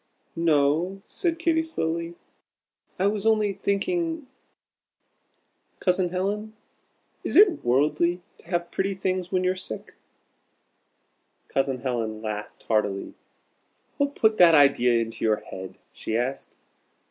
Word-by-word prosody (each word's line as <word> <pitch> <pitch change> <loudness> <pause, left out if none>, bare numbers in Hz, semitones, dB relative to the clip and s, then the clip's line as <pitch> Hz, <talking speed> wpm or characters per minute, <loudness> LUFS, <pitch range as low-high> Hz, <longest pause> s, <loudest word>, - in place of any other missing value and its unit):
"No," 165 +4 +1
said 340 -4 -2
Katy, 330 -1 +2
slowly, 170 - -3 0.8
"I 185 - +1
was 210 +1 0
only 215 -2 +3
thinking 325 - -1 1.5
Cousin 180 -1 +1
Helen, 205 +4 -3 0.7
is - - -3
it 385 -7 +6
worldly 150 +7 +2 0.2
to - - -17
have 175 -1 -2
pretty 195 0 -1
things 185 -1 -2
when 185 0 +1
you're 185 0 +2
sick?" 185 -12 -7 1.6
Cousin 135 -2 -1
Helen 115 -4 -2
laughed 105 -1 -6
heartily. 105 -3 -1 0.8
"What 285 0 0
put 220 -1 +2
that 170 -2 +8
idea 125 -5 +5
into 115 0 -4
your 110 -1 +3
head?" 95 0 -9 0.2
she 110 - -3
asked. 130 +3 -3
175 Hz, 115 wpm, -25 LUFS, 130-205 Hz, 1.6 s, that